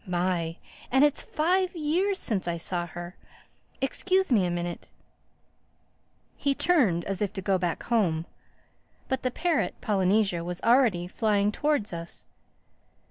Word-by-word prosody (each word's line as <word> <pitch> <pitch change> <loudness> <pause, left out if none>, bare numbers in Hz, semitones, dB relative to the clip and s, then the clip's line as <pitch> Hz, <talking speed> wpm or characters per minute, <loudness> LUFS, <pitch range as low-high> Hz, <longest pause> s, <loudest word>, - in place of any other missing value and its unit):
My! 175 -2 -1 0.3
And 265 +2 +4
it's 295 -1 +3
five 365 +4 0
years 350 +6 0
since 205 - -2
I 170 0 -1
saw 175 +1 -3
her—Excuse 265 - -4
me 200 -7 +4
a - - -1
minute." 175 0 -4 1.5
He 280 -1 0
turned 230 - +2
as 195 -1 -3
if 205 -2 0
to 190 - -4
go 190 -1 +2
back 175 -2 -2
home. 175 -9 +1 0.8
But 265 -1 0
the 255 - 0
parrot, 315 - 0
Polynesia, 195 -3 +1
was 175 +1 -4
already 230 -8 +3
flying 205 +1 +1
towards 290 -6 0
us. 170 0 -8
205 Hz, 135 wpm, -27 LUFS, 175-275 Hz, 1.5 s, And